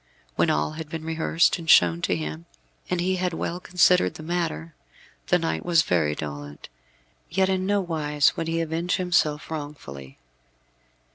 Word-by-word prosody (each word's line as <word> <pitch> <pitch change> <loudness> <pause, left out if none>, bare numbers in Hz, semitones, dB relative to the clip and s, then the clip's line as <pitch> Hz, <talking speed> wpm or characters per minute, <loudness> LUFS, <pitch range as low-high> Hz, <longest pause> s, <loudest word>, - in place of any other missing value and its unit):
When - - +2
all 75 0 +1
had 155 -1 -7
been 160 0 -6
rehearsed 165 +2 +1
and 165 -1 -7
shown 85 - +6
to 90 - +1
him, 80 0 -5 0.4
and 180 - 0
he 185 +2 0
had 180 -1 -1
well 170 +2 -3
considered 180 0 +3
the 155 - -9
matter, 155 - -3 0.5
the - - +4
knight 80 0 -2
was 165 -2 +3
very 80 - +1
dolent; 75 -1 -7 0.6
yet 190 +2 +1
in 190 0 0
no 205 0 +2
wise 150 -5 +1
would 165 - -3
he 165 0 0
avenge 165 +2 -1
himself 160 -5 0
wrongfully. 105 - -7
160 Hz, 160 wpm, -25 LUFS, -, 0.6 s, shown